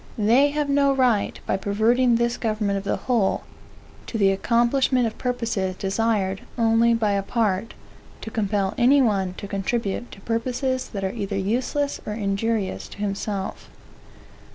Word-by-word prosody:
They 235 +7 +4
have 295 0 -1
no 280 0 +3
right, 245 -6 +1
by - - 0
perverting 230 +5 +2
this 235 +1 +1
government 215 -3 -1
of - - -9
the 200 - 0
whole, 230 -6 +1 0.6
to 230 - -3
the 195 -2 +4
accomplishment 240 +5 +2
of 225 - -3
purposes 230 -7 -1
desired 195 -1 0 0.2
only 230 0 +4
by 220 -2 +1
a 200 0 +1
part, 210 0 -1 0.5
to 220 - -7
compel 205 -2 0
any 260 +4 +5
one 195 -7 +1
to 200 - -7
contribute 200 +3 -2
to 195 - -13
purposes 255 +4 -1
that 195 -3 -5
are 190 +1 -1
either 200 -3 -3
useless 255 +8 -1
or 210 - -4
injurious 205 -1 -1
to - - -13
himself. 200 -1 -4
225 Hz, 155 wpm, -24 LUFS, 200-240 Hz, 0.6 s, any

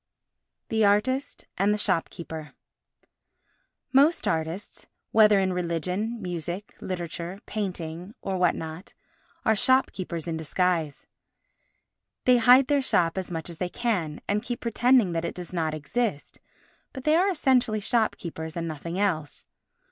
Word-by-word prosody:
The 220 -1 +2
Artist 225 +7 +1
and 200 +2 +3
the 210 - +1
Shopkeeper 165 -5 -1 1.4
Most 290 +5 +4
artists, 165 +4 -3 0.2
whether 210 -2 +6
in 190 -1 +1
religion, 180 +6 -2
music, 175 +1 -5
literature, 175 +1 -5
painting, 180 -2 -5
or 195 - -3
what 180 -2 +3
not, 160 +4 -8 0.5
are 220 - +4
shopkeepers 190 - +1
in 165 -1 -2
disguise. 160 -1 -1 1.2
They 250 -1 +6
hide 250 +3 +7
their 285 0 +2
shop 170 -10 +2
as 190 -1 -4
much 165 -2 -4
as 170 -2 -8
they 180 - -1
can, 180 -10 -2
and 205 +1 +1
keep 240 +1 -4
pretending 240 -3 +3
that 165 -1 -2
it 170 - -4
does 180 0 -8
not 160 -3 -1
exist, 155 +2 -3 0.5
but 265 - -7
they 305 +2 +4
are 370 +4 +4
essentially 255 - +2
shopkeepers 175 -8 -1
and 165 0 -2
nothing 165 +3 -5
else. 160 -8 -1
185 Hz, 135 wpm, -26 LUFS, 165-225 Hz, 1.4 s, hide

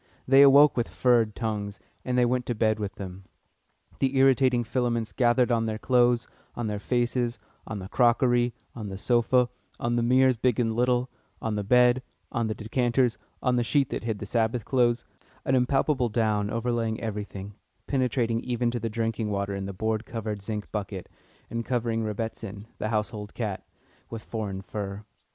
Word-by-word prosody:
They 135 +1 +7
awoke 140 +1 +7
with 120 -1 0
"furred" 115 -4 +2
tongues, 105 -2 -3 0.2
and 125 -1 -1
they 125 - +5
went 125 0 0
to 120 - -1
bed 110 0 +1
with 100 -2 -4
them. 95 -1 -8 0.7
The 135 0 +1
irritating 130 -2 +4
filaments 120 -1 -1
gathered 125 0 +3
on 115 -1 +1
their 110 -1 -2
clothes, 120 0 +3 0.3
on 120 - -3
their 105 -1 -2
faces, 120 +1 0 0.3
on 110 - -4
the 95 -1 -6
crockery, 120 +1 +3 0.2
on 110 -4 -6
the 95 - -6
sofa, 120 +3 +3 0.3
on 120 0 0
the - - +2
mirrors 130 +1 +4
(big 125 0 +1
and 115 -2 +1
little), 125 +1 +1 0.3
on 110 - -2
the 105 -1 -1
bed, 125 +3 +4 0.3
on 115 -1 0
the 110 - -2
decanters, 120 +2 +1 0.2
on 125 -1 +2
the 120 - +2
sheet 135 +2 +1
that - - -3
hid 110 -2 -2
the 100 - -6
Sabbath 115 +2 0
clothes 120 -2 +2 0.4
an 130 - +1
impalpable 130 0 +2
down 105 -2 +1
overlaying 115 -1 -1
everything, 105 -2 -5 0.3
penetrating 125 -4 0
even 120 -1 -1
to 120 - -2
the 115 - -2
drinking 115 -1 -2
water 100 -1 -2
in 100 0 -4
the - - -4
board 110 +3 -2
covered 110 -3 -4
zinc 105 +1 -5
bucket, 100 -3 -5 0.4
and 115 0 -3
covering 115 -2 -1
"Rebbitzin," 110 -1 -5
the 110 - -2
household 105 -1 -3
cat, 105 -5 -4 0.4
with 115 -1 -7
foreign 100 -4 -4
fur. 100 +1 -5
115 Hz, 175 wpm, -27 LUFS, 105-125 Hz, 0.7 s, They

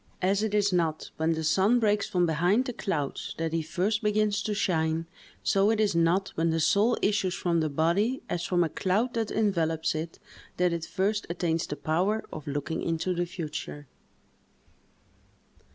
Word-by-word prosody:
As 195 +2 +2
it 215 -1 -1
is 205 -2 +2
not 165 -3 0
when 160 +1 +1
the 160 0 -3
sun 195 +9 +3
breaks 210 -2 +1
from 180 -1 +2
behind 175 +9 +2
the 250 - -4
clouds 150 -10 -3
that 165 0 -2
he 165 - +1
first 190 +7 -1
begins 210 -1 +1
to 210 - -2
shine, 160 -4 0 0.4
so 195 +1 +3
it 220 -1 +1
is 210 -2 +2
not 170 +4 +2
when 165 +1 +1
the 165 0 +1
soul 210 +9 +3
issues 195 -3 +1
from 170 -2 0
the 155 -1 0
body, 170 - +1
as 175 0 -2
from 175 -1 +2
a 165 - -1
cloud 210 +10 0
that 225 -2 -1
envelops 165 -7 0
it, 160 +1 -5 0.4
that 180 -1 +2
it 165 -1 -3
first 205 +2 -1
attains 170 -1 -1
the 145 - -4
power 180 +9 0
of 155 -2 -8
looking 145 +3 -3
into 165 +2 -1
the 175 0 -1
future. 155 -3 -6
180 Hz, 180 wpm, -28 LUFS, 160-205 Hz, 0.4 s, sun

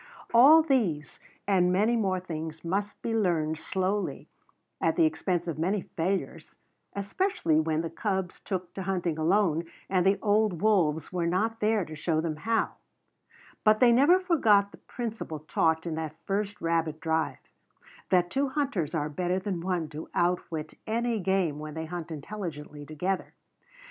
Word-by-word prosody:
All 290 +7 +8
these 215 - 0 0.3
and 180 -3 +3
many 210 +6 +3
more 190 -5 +1
things 160 -2 -6
must 200 +4 -2
be 230 - -1
learned 165 -7 +1
slowly 190 +4 -2 0.5
at - - +2
the 335 - +4
expense 180 - -1
of 160 -2 -3
many 190 +5 0
failures, 185 +4 -2 0.4
especially 200 - 0
when 160 0 0
the 165 - -4
cubs 190 0 -2
took 185 -3 -4
to 195 - -5
hunting 180 -4 -1
alone 170 -1 +2 0.2
and 185 -2 +2
the 195 +2 +3
old 210 -4 +1
wolves 170 -6 +2
were 175 -2 0
not 220 +6 0
there 210 -3 +2
to 155 - -9
show 155 +1 0
them 160 -1 -2
how; 225 +7 0 0.9
but 215 0 +5
they 245 +1 +6
never 285 +10 +5
forgot 225 - +3
the - - -15
principle 225 -9 -5
taught 160 +1 +1
in 170 - -2
that 160 -1 -4
first 205 +1 -2
rabbit 165 -2 0
drive, 160 -4 0 0.7
that 175 -1 +3
two 275 0 +1
hunters 255 - -1
are 150 -2 0
better 175 +4 -1
than 190 -3 -3
one 175 -3 -1
to 155 +2 -8
outwit 170 -3 -1
any 230 0 0
game 185 -6 0
when 155 0 -7
they 160 0 -4
hunt 170 0 -6
intelligently 150 -3 -6
together. 180 +5 -3
180 Hz, 160 wpm, -28 LUFS, 160-210 Hz, 0.9 s, All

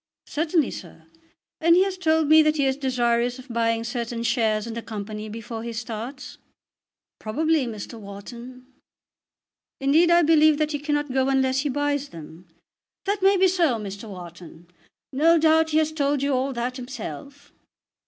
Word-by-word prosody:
"Certainly, 310 -2 0
sir. 165 -2 -10 0.5
And 335 +1 +5
he 370 - +5
has 390 -1 -2
told 320 -4 +1
me 315 +1 +7
that 305 0 +2
he 280 - +2
is 265 0 +1
desirous 245 -2 0
of 255 0 -12
buying 230 -1 0
certain 235 0 -4
shares 225 -3 +1
in 230 - -6
the 230 - -5
Company 215 0 -6
before 225 +1 -7
he 235 0 -5
starts." 235 +4 -7 0.8
"Probably, 305 +4 0
Mr. 225 +1 -7
Wharton." 235 +5 -10 1.1
"Indeed, 300 +5 +4
I 345 0 +5
believe 310 -1 +5
he 290 - -2
cannot 295 -2 -2
go 265 0 +1
unless 265 -1 +2
he 290 +2 -1
buys 290 +1 -1
them." 165 +2 -12 0.6
"That 405 0 -1
may 390 +1 +4
be 380 +1 +5
so, 345 -8 +2
Mr. 200 +1 -7
Wharton. 175 -2 -11 0.4
No 325 +5 +4
doubt 320 0 +3
he 310 - +1
has 315 0 +2
told 285 -2 0
you 280 0 +1
all 265 +2 0
that 250 +1 -3
himself." 255 - -8
260 Hz, 165 wpm, -24 LUFS, 230-305 Hz, 1.1 s, me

